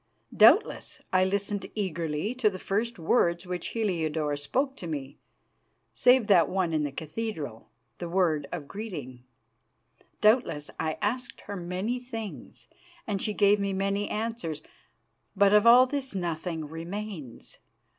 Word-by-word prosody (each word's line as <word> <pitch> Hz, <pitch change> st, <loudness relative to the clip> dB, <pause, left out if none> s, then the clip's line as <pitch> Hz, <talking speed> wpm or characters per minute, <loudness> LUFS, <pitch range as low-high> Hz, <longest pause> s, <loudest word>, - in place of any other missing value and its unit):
Doubtless, 240 Hz, -, +4 dB
I 185 Hz, 0 st, +5 dB
listened 200 Hz, +1 st, -1 dB
eagerly 170 Hz, -1 st, -2 dB
to 250 Hz, -4 st, +2 dB
the 190 Hz, -, -7 dB
first 220 Hz, +5 st, -2 dB
words 170 Hz, 0 st, +2 dB
which 180 Hz, -1 st, -4 dB
Heliodore 160 Hz, -9 st, -1 dB
spoke 260 Hz, -, -1 dB
to 175 Hz, -, -6 dB
me, 140 Hz, -3 st, -5 dB, 0.7 s
save 250 Hz, -2 st, +5 dB
that 195 Hz, -5 st, +5 dB
one 185 Hz, -3 st, 0 dB
in 155 Hz, -1 st, +1 dB
the 145 Hz, -, -2 dB
cathedral, 155 Hz, -, -5 dB, 0.3 s
the 175 Hz, -, -4 dB
word 165 Hz, -5 st, +1 dB
of 155 Hz, -5 st, -5 dB
greeting. 145 Hz, -, -7 dB, 0.9 s
Doubtless, 210 Hz, -, +2 dB
I 155 Hz, 0 st, -1 dB
asked 245 Hz, +4 st, -2 dB
her 205 Hz, -, -7 dB
many 185 Hz, +7 st, -3 dB
things, 225 Hz, -4 st, -7 dB, 0.4 s
and 200 Hz, -3 st, -2 dB
she 210 Hz, -, 0 dB
gave 205 Hz, 0 st, +4 dB
me 200 Hz, -1 st, -1 dB
many 195 Hz, +1 st, -1 dB
answers. 210 Hz, -9 st, -3 dB, 0.7 s
But 200 Hz, 0 st, +5 dB
of 210 Hz, +2 st, +6 dB
all 245 Hz, +2 st, +9 dB
this 265 Hz, -3 st, -3 dB
nothing 170 Hz, -2 st, -3 dB
remains. 165 Hz, -, -7 dB
190 Hz, 135 wpm, -28 LUFS, 160-215 Hz, 0.9 s, all